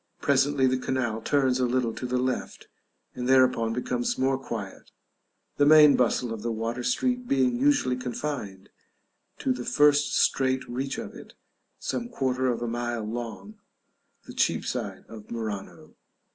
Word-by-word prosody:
Presently 140 -1 +2
the 130 0 +2
canal 125 -4 -2
turns 130 0 +1
a 125 - +2
little 120 -2 0
to 125 - -5
the 125 +1 0
left, 130 0 -3 0.5
and 125 0 -4
thereupon 130 -3 +4
becomes 120 +1 -2
more 135 +1 +2
quiet, 110 -7 -7 0.7
the 145 - +4
main 150 -1 +8
bustle 120 -1 +1
of 110 - -7
the 115 +1 -2
water 115 +2 -3
street 250 - 0
being 130 - +2
usually 135 -2 +2
confined 125 -6 -5 0.7
to 130 - 0
the 125 -1 -6
first 145 +2 +3
straight 130 -1 +1
reach 130 +3 -3
of - - -6
it, - - -13 0.4
some 240 0 -4
quarter 130 - -1
of 120 -1 -1
a - - -2
mile 120 -1 -3
long, 120 - -6 0.7
the - - -10
Cheapside - - -2
of 110 -2 -12
Murano. 110 -4 -6
125 Hz, 150 wpm, -26 LUFS, 120-135 Hz, 0.7 s, main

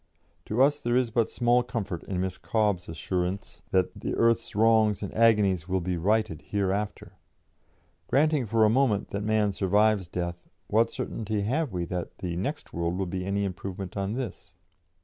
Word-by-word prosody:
"To 120 +5 +3
us 145 +1 +3
there 120 -2 0
is 125 -2 +2
but 115 -1 +1
small 120 0 +3
comfort 110 -8 -4
in 95 -2 -3
Miss 95 -1 -3
Cobbe's 105 -6 0
assurance 90 +3 -3
that 95 -1 +2
'earth's 115 -1 +1
wrongs 110 -1 +4
and 100 - -5
agonies' 105 -7 +3
'will 95 0 +1
be 90 +1 -2
righted 95 -2 0
hereafter.' 100 +1 -3 0.9
Granting 150 -3 +2
for 110 +1 +4
a - - +6
moment 115 -5 +2
that 100 - -2
man 105 -1 +2
survives 100 0 +2
death 85 0 -5 0.2
what 115 +4 +2
certainty 110 -2 -3
have 135 +7 0
we 90 -2 -2
that 90 0 -5
'the 90 -2 -4
next 140 - -4
world' 85 +1 -1
will 95 - -1
be 90 +1 -3
any 100 +1 0
improvement 95 0 -5
on 100 +1 -2
this? 125 -4 -6
100 Hz, 170 wpm, -27 LUFS, 90-115 Hz, 0.9 s, a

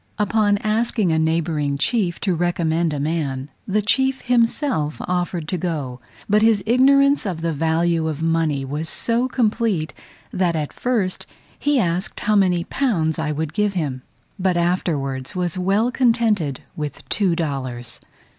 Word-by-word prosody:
Upon 210 -1 +2
asking 215 -3 +1
a 160 - +2
neighbouring 160 -3 0
chief 180 - 0
to 190 - +1
recommend 170 -1 0
a 145 - -3
man, 145 -3 -2 0.2
the 210 +1 +1
chief 265 +4 +1
himself 235 - +1
offered 175 -2 -2
to 180 - -1
go; 145 -8 -3 0.3
but 210 +1 +3
his 220 -3 +3
ignorance 275 +4 +4
of 180 -6 -3
the 165 -1 -1
value 165 +2 +1
of 155 -2 -3
money 165 -4 +1
was 150 +4 -3
so 235 +2 +1
complete, 220 -9 0 0.4
that 180 -2 +1
at 150 -2 -3
first 220 -7 -1 0.3
he 290 -1 +2
asked 180 -1 -1
how 215 0 +2
many 180 -4 +3
pounds 170 - 0
I 155 -1 -1
would 155 0 -3
give 210 -1 +1
him, 140 -7 -2 0.4
but 185 -1 +1
afterwards 150 -7 -1
was 180 -1 -1
well 195 +6 +1
contented 225 - +1
with 150 -2 -6
two 190 -5 +1
dollars. 130 -7 -4
175 Hz, 150 wpm, -21 LUFS, 155-215 Hz, 0.4 s, ignorance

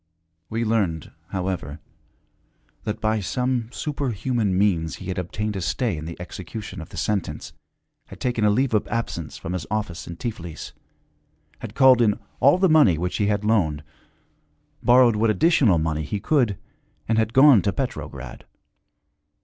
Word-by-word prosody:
We 115 +1 -1
learned, 100 -8 -1 0.2
however, 90 -6 -4 1.1
that 105 0 -3
by 110 0 0
some 125 +3 -1
superhuman 120 -9 -1
means 90 -5 +1
he 95 - -8
had 90 - -2
obtained 105 +4 -3
a 95 - -3
stay 110 +3 -1
in 75 0 -6
the 85 +1 -8
execution 95 +2 -7
of 80 - -10
the - - -10
sentence, 105 -4 -2 0.5
had - - -12
taken 120 -3 -1
a 105 - +5
leave 125 +4 +1
of 105 - +1
absence 115 -9 -4
from 85 - -5
his 90 - -4
office 105 -6 -3
in 85 - -6
Tiflis, 85 -9 -6 0.9
had 115 -1 -8
called 130 -3 +6
in 105 -3 +3 0.2
all 140 +6 +5
the 190 +1 +3
money 150 - +5
which 90 +2 -2
he 105 - +1
had 105 0 0
loaned, 80 -9 +1 1.0
borrowed 120 -2 +5
what 110 +2 +2
additional 130 - +4
money 80 -1 -1
he 90 +7 -3
could, 120 - +1 0.5
and 110 0 +2
had 110 0 0
gone 130 -4 +7
to 100 - 0
Petrograd. 130 +3 -6
105 Hz, 155 wpm, -23 LUFS, 90-120 Hz, 1.1 s, gone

